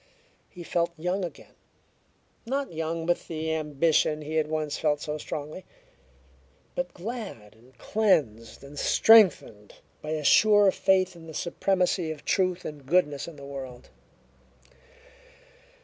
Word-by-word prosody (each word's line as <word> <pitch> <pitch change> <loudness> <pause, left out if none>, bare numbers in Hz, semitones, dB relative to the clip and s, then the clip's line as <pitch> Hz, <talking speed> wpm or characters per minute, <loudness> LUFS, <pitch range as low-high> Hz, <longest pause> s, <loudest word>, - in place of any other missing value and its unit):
He 175 - -10
felt 170 0 -1
young 180 +4 -2
again 175 - -8 0.9
not 270 -2 -3
young 165 +1 -3
with 175 +1 -1
the 160 -1 -3
ambition 155 0 +1
he 155 +1 -6
had 155 -1 +1
once 155 -1 -2
felt 150 -1 +1
so 150 +1 -5
strongly, 150 +5 -6 1.1
but - - -4
glad 195 - -7
and 120 +3 -23
cleansed 120 - 0
and 140 +1 -9
strengthened 190 - +4 0.3
by 150 - -7
a 155 -1 -3
sure 205 +4 +5
faith 185 -1 +1
in 165 -1 -13
the 160 - -9
supremacy 180 -1 0
of 155 -2 -7
truth 185 -2 0
and 150 -2 -7
goodness 150 -4 +1
in 170 - -9
the 140 -1 -11
world. 130 -3 -9
160 Hz, 135 wpm, -27 LUFS, 145-185 Hz, 1.1 s, sure